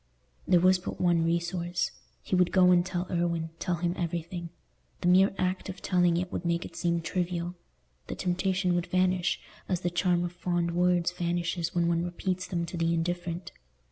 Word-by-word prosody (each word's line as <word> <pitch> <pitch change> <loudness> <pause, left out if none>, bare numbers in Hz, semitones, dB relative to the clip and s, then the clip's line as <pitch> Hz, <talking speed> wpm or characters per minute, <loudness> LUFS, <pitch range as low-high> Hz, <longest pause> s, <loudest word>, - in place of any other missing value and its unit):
There 180 -2 +5
was 185 +1 +5
but - - -6
one 170 -2 +3
resource. 170 +1 -1 0.3
He - - 0
would 180 -1 +3
go 180 0 +6
and 175 -1 +5
tell 180 -1 -3
Irwine—tell 170 0 -1
him 170 +1 -1
everything. 170 0 -4 0.5
The - - 0
mere 190 +2 +6
act 185 +1 -1
of 190 - -6
telling 175 -2 +3
it 180 +1 -2
would - - -3
make 170 0 0
it - - -10
seem 170 -1 0
trivial; 175 0 -2 0.5
the - - -4
temptation 185 0 0
would 175 0 0
vanish, 185 0 +1 0.3
as 180 -2 0
the 175 - -1
charm 175 0 +2
of 175 - -3
fond 175 -1 -1
words 175 0 +2
vanishes 170 -1 -2
when 170 -1 +2
one 170 0 +1
repeats 185 +1 -3
them 170 -2 -2
to 175 - -6
the 165 0 +1
indifferent. 175 +1 -3
175 Hz, 180 wpm, -29 LUFS, 170-180 Hz, 0.5 s, go